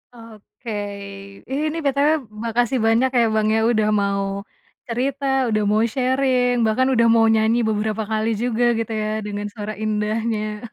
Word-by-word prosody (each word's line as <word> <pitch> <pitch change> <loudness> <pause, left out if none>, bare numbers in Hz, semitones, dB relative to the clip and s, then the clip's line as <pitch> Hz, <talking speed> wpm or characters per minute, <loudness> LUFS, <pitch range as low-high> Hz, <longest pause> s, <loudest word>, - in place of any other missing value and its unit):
Oke, 225 0 -11 0.8
ih 275 - -1
ini, 315 +2 -3
BTW 280 +2 +2 0.3
makasih 240 +2 0
banyak 235 +4 +3
ya - - +4
Bang 215 0 +2
ya - - +2
udah 215 -2 +1
mau 200 0 0 0.6
cerita, 265 +4 -2 0.3
udah 215 0 +1
mau 215 +1 +3
sharing, 255 -1 +1
bahkan 255 +4 +2
udah 230 -1 +4
mau 225 - +5
nyanyi 220 +2 +2
beberapa 215 0 -1
kali 220 0 0
juga 245 -1 0 0.2
gitu 225 0 -3
ya 215 - -2 0.2
dengan 205 0 -4
suara 215 0 -6
indahnya. 215 0 -2
225 Hz, 150 wpm, -21 LUFS, 215-250 Hz, 0.8 s, mau